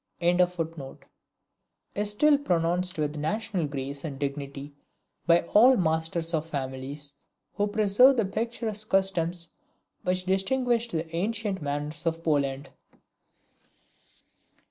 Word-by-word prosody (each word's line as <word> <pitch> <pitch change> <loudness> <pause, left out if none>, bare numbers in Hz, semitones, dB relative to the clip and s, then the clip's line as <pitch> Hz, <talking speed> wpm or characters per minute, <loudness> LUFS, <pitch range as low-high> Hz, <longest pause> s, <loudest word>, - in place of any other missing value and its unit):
"] - - -46 1.7
is 205 0 -1
still 290 +8 +4
pronounced 180 -7 0
with 150 -1 -1
a - - -5
national 200 +1 -1
grace 140 0 -5
and 145 -4 -5
dignity 140 0 -5 0.5
by 170 0 +6
all 250 +4 +7
masters 165 0 0
of 155 -2 +1
families 140 -1 -5 0.4
who 205 0 0
preserve 215 +5 +5
the 225 - +2
picturesque 220 0 -3
customs 175 -3 0 0.5
which 180 0 -1
distinguished 235 +5 +1
the 160 -1 -3
ancient 205 0 -2
manners 145 +2 -3
of 165 0 -1
Poland. 140 -3 0
170 Hz, 110 wpm, -27 LUFS, 150-210 Hz, 1.7 s, all